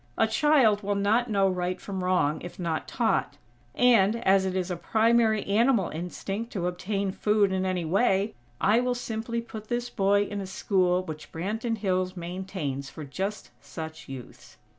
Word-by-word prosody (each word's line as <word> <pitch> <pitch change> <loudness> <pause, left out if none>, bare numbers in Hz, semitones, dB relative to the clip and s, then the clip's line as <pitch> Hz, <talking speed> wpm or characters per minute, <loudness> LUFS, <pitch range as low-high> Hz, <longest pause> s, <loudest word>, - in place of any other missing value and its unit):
A - - +4
child 220 -3 +3
will 205 0 -1
not 220 +5 +2
know 195 -2 +3
right 180 0 -1
from 190 -2 -5
wrong 180 -5 +1
if 175 - -8
not 170 -3 -2
taught; - - 0 0.4
and, 230 -4 +5
as 190 0 +4
it 185 - -3
is 185 0 -1
a - - -1
primary 220 +3 +2
animal 220 -1 +3
instinct 195 +7 -5
to 185 -5 -2
obtain 190 +2 -2
food 210 0 +2
in 190 0 0
any 180 -2 -1
way, 195 +3 +2 0.3
I 215 +4 +4
will 250 0 0
simply 235 -1 -3
put 220 -2 -9
this 240 +1 -2
boy 200 +1 +3
in 205 0 -4
a 190 - -5
school 185 -1 +1
which 155 -3 -8
Branton 220 +7 -2
Hills 185 -2 -1
maintains 170 -6 -4
for 155 - -8
just 190 +9 -4
such 160 -3 -8
youths." 130 -2 -10
195 Hz, 170 wpm, -27 LUFS, 180-220 Hz, 0.4 s, and